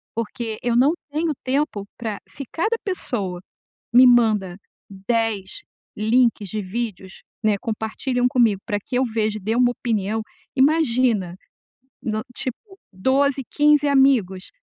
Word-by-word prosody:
porque 230 0 -4
eu 240 -1 0
não 260 +5 +5 0.2
tenho 310 +2 -1
tempo 260 -6 -1
pra 220 -3 -4
se 280 - -8
cada 435 +8 0
pessoa 205 - -3 0.5
me 250 +2 +8
manda 215 -7 +3 0.3
10 200 0 -2 0.4
links 220 -1 +2
de 215 +3 -3
vídeos, 195 -1 -5 0.2
né, 215 -2 +3
compartilham 245 +2 -1
comigo 230 -6 +2
pra 205 - -1
que 250 - -3
eu 260 - +3
veja 220 -2 -1
dê 215 +4 -1
uma 245 0 +4
opinião, 220 -3 -1 0.4
imagina 255 - +2 0.7
no, 215 -1 -2
tipo, 385 - -6 0.2
12, 270 +7 +1
15 295 0 +4
amigos, 260 -10 +2
235 Hz, 125 wpm, -22 LUFS, 210-265 Hz, 0.7 s, me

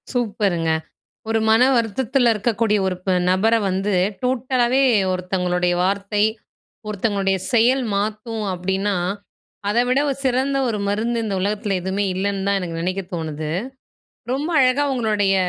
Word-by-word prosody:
சூப்பருங்க! 205 -9 0 0.6
ஒரு 225 0 +2
மன 225 +1 +5 0.2
வருத்தத்தில 240 +2 +1
இருக்கக்கூடிய 215 0 +1
ஒரு 185 -1 -1
ப 190 - +2 0.2
நபர 205 +5 +3 0.2
வந்து 195 +2 -1 0.3
டோட்டலாவே 255 0 +1 0.3
ஒருத்தவங்களுடைய 180 -1 0
வார்த்தை, 200 +2 0 0.6
ஒருத்தவங்களுடைய 200 -2 0
செயல் 250 +3 +4
மாத்தும் 215 +2 -2
அப்படின்னா, 190 +2 -1 0.7
அத 210 +3 +1
விட 255 +2 +3
ஒரு, 275 - -1
சிறந்த 265 +2 +1
ஒரு 220 -3 -1
மருந்து 225 +4 0
இந்த 205 -3 -2
உலகத்தில 205 0 -1
எதுவுமே 190 +3 -1
இல்லன்னு 195 +1 -2
தான் 200 0 +2
எனக்கு 170 -2 -4
நெனைக்க 185 +3 -2
தோணுது. 155 -2 -4 0.8
ரொம்ப 290 +6 -2
அழகா 260 +2 +3
உங்களுடைய 210 -5 +1
205 Hz, 130 wpm, -21 LUFS, 190-235 Hz, 0.8 s, மன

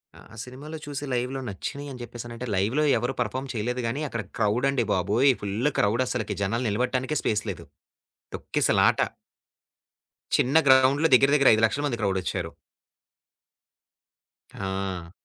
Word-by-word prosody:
ఆ! - - -15 0.2
సినిమాలో 145 +5 -9
చూసి 145 0 -5
లైవ్‌లో 125 +2 -2
నచ్చినయని 135 +6 -6
చెప్పేసనంటే 120 +1 -7
లైవ్‌లో 110 +11 +1
ఎవరు 120 +3 -2
పెర్ఫార్మ్ 130 +3 -3
చేయలేదు 120 +3 -2
గాని, 135 +6 -2
అక్కడ 115 -3 -4 0.2
క్రౌడ్ 115 +5 +2
అండి 130 -5 0
బాబోయ్! 105 +9 +3
ఫుల్ 105 +7 0
క్రౌడ్ 115 +5 +2
అసలకి 120 -3 -2
జనాలు 115 +5 -1
నిలబడటానికే 125 +6 -1
స్పేస్ 105 -1 0
లేదు. 95 - -6 0.7
తొక్కిసలాట. - - +2 1.4
చిన్న 130 +5 +1
గ్రౌండ్‌లో 130 +4 +5
దగ్గర, 135 +2 +5
దగ్గర 140 -2 +5
5,00,000 110 +6 +1
మంది 120 -4 -3
క్రౌడొచ్చారు. 95 -3 -1 2.0
ఆ! 95 -3 -4
120 Hz, 120 wpm, -26 LUFS, 105-135 Hz, 2.0 s, గ్రౌండ్‌లో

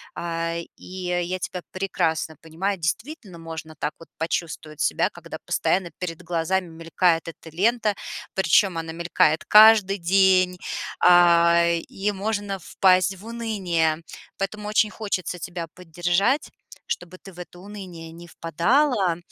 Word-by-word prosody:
А, 165 0 -3 0.2
и - - -15
я 180 0 -3
тебя 180 0 -5
прекрасно 165 -5 -1
понимаю, 180 +5 -3
действительно 200 - -4
можно 160 -1 -8
так 150 - -3
вот 165 - -13
почувствовать 160 -2 -4
себя, - - +1
когда - - -9
постоянно 180 -2 0
перед 180 -2 -5
глазами 175 +2 -1
мелькает 165 +1 0
эта 165 0 -10
лента, 220 +2 +2 0.4
причём 190 0 +3
она 165 0 -5
мелькает 165 -2 +1
каждый 210 -2 +7
день, 185 0 +3 0.4
а, 170 -1 +6
и 180 +4 -2
можно 205 0 -3
впасть 185 +2 +2
в 200 - -14
уныние. 195 -9 -1 0.4
Поэтому 210 +2 -4
очень 210 0 +2
хочется 190 -5 -3
тебя 170 0 -5
поддержать, 180 - 0 0.4
чтобы 175 +1 -5
ты 195 0 -13
в 180 - -14
это 175 0 -10
уныние 180 -5 -9
не 170 +1 -12
впадала. 185 - +1
180 Hz, 130 wpm, -24 LUFS, 165-195 Hz, 0.4 s, каждый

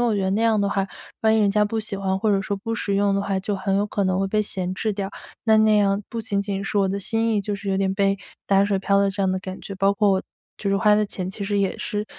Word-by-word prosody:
我 235 -3 +2
觉 200 - 0
得 190 - 0
那 205 - +1
样 220 -2 +3
的 200 - +1
话， 195 -1 0 0.4
万 220 0 +4
一 - - +3
人 205 -1 +3
家 210 +1 +3
不 220 +1 -2
喜 210 -2 -4
欢， 190 -1 -1
或 215 +2 +1
者 195 - +2
说 200 +1 -3
不 225 +4 -5
实 200 -3 -1
用 200 0 +2
的 - - +1
话， 195 -1 -1
就 200 +1 -2
很 195 +1 0
有 205 - +2
可 205 -1 -1
能 185 0 +1
会 195 - 0
被 215 +2 +1
闲 185 -3 -3
置 215 +2 -1
掉。 195 -1 -4 0.3
那 220 -1 +5
那 215 0 +5
样 200 -1 +2
不 230 - -4
仅 205 -2 -1
仅 200 -1 -3
是 200 +1 -1
我 195 -1 +2
的 200 +1 -2
心 225 +2 0
意 210 - +2
就 205 +1 -3
是 200 0 -7
有 190 - +1
点 190 0 +1
被， 195 0 +2 0.3
打 195 0 +4
水 200 -1 +1
漂 200 +1 +1
了 200 0 +3
这 200 - -5
样 190 - +2
的 185 - -1
感 185 0 -7
觉， 195 - -7
包 195 +1 +3
括 205 -1 +3
我， 190 -1 +1 0.4
就 200 - -2
是 195 - +2
花 210 +2 +4
的 210 0 +2
钱 185 -2 -5
其 200 - -7
实 200 0 0
也 195 -1 0
是 210 0 -2
200 Hz, 340 characters per minute, -23 LUFS, 195-210 Hz, 0.4 s, 那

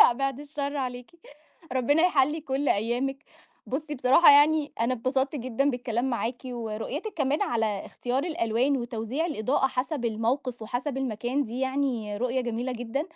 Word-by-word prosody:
لأ، 245 - +9
بعيد 275 +2 -2
الشر 290 -1 -4
عليكِ، 250 0 -4 0.6
ربنا 275 +5 +3
يحلّي 305 -2 +3
كُلّ 280 0 -1
أيامِك، 250 +6 0 0.4
بُصي 295 +3 -3
بصراحة 270 +5 +6
يعني 295 +1 +5
أنا 235 +3 +2
اتبسطت 265 +4 0
جدًا 255 +2 0
بالكلام 245 +1 -1
معاكِ، 235 +1 -2
ورؤيتِك 245 - -4
كمان 290 -1 +1
على 220 -4 -1
اختيار 255 +4 -2
الألوان، 260 -3 +1
وتوزيع 240 +5 -2
الإضاءة 265 -2 +1
حسب 265 +1 -2
الموقف، 235 +2 -1
وحسب 255 +5 -3
المكان 255 +2 -1
دي 245 +2 -5
يعني 260 -6 -1
رؤية 250 +3 0
جميلة 245 +1 -2
جدًا، 245 +4 -3
255 Hz, 145 wpm, -27 LUFS, 235-285 Hz, 0.6 s, لأ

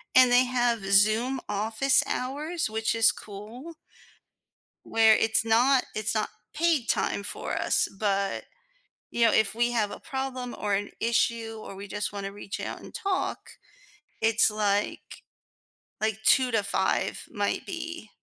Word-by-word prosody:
And 255 -1 +7
they 250 +1 +5
have 245 -3 0
Zoom 220 +6 +3
office 220 +6 +2
hours, 300 +7 -2
which 220 +1 -1
is 225 0 +5
cool. 220 +11 -10 1.1
Where 220 -1 +5
it's 220 0 +2
not 245 +4 +4
it's 215 +1 -1
not 215 - 0 0.2
paid 310 -6 +1
time 200 - 0
for - - -4
us, - - +1
but, 200 -2 0 0.7
you 235 - +2
know, 225 - +3
if 220 -2 +3
we 240 +1 +1
have 215 -4 0
a - - -8
problem 260 -2 -4
or 205 -1 0
an 200 +1 -2
issue 230 -1 0
or - - -9
we 200 +1 -8
just 205 +1 -3
wanna 200 -1 -5
reach 205 0 -7
out - - -5
and - - -13
talk, 395 -5 -2 0.7
it's 220 0 +3
like 205 -1 -2 0.8
like 215 -1 0
2:00 255 -2 +5
to 225 -3 +1
5:00 195 -1 0
might 205 -1 -2
be. 330 - -6
225 Hz, 150 wpm, -27 LUFS, 210-255 Hz, 1.1 s, And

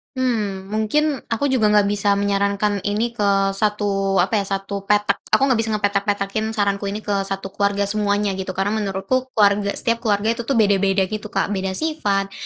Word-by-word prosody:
Hmm. 210 -7 -2
Mungkin 275 +7 0
aku 230 +5 0
juga 235 -5 +3
enggak 210 -1 +4
bisa 205 0 +1
menyarankan 200 0 0
ini 220 +3 0
ke 200 -3 +1
satu, 195 -1 0
apa 190 +4 +2
ya, 195 - -5
satu 195 +1 -5
petak. 210 0 +2
Aku - - +3
enggak 255 -4 +2
bisa 225 - -2
ngepetak-petakin 205 +1 -1
saranku 200 -1 0
ini 210 +2 -5
ke 205 - -1
1 195 0 -5
keluarga 200 0 0
semuanya 205 -1 0
gitu 190 0 -5
karena 200 +2 0
menurutku 205 +7 -2
keluarga 200 -1 +3
setiap 230 0 0
keluarga 215 0 +1
itu 235 - -5
tu 275 - +1
beda-beda 200 -2 +3
gitu, 215 +2 -5
Kak. 210 - -1
Beda 190 -1 -2
sifat, 205 -12 0
205 Hz, 180 wpm, -21 LUFS, 195-215 Hz, -, enggak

